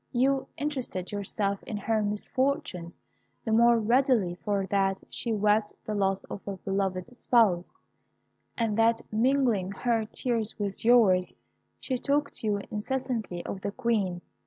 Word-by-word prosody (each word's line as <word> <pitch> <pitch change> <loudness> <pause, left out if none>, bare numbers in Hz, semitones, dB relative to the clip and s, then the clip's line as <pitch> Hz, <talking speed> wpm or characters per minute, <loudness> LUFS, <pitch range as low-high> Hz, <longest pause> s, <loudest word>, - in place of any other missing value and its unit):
You 265 +2 +2
interested 260 -11 -3
yourself 200 0 -2
in 215 - -5
her 220 +2 0
misfortunes 205 -4 -1 0.5
the 225 - -1
more 235 +1 +5
readily 235 -4 +2
for 200 +2 -2
that 195 0 +1
she 235 - -3
wept 210 0 +2
the 215 - -3
loss 195 -1 0
of 200 - -7
a 195 -1 -4
beloved 195 +3 -2
spouse, 215 -8 +3 0.9
and 225 -3 0
that 225 0 +3
mingling 235 -5 +2
her 230 0 0
tears 225 -1 -2
with 200 -2 -4
yours, 215 -6 +5 0.5
she 255 -2 -2
talked 285 +2 0
to 220 - -4
you 205 -1 +1
incessantly 225 -5 -3
of 190 - -5
the 200 - -2
Queen. 205 -7 -1
215 Hz, 140 wpm, -28 LUFS, 195-240 Hz, 0.9 s, more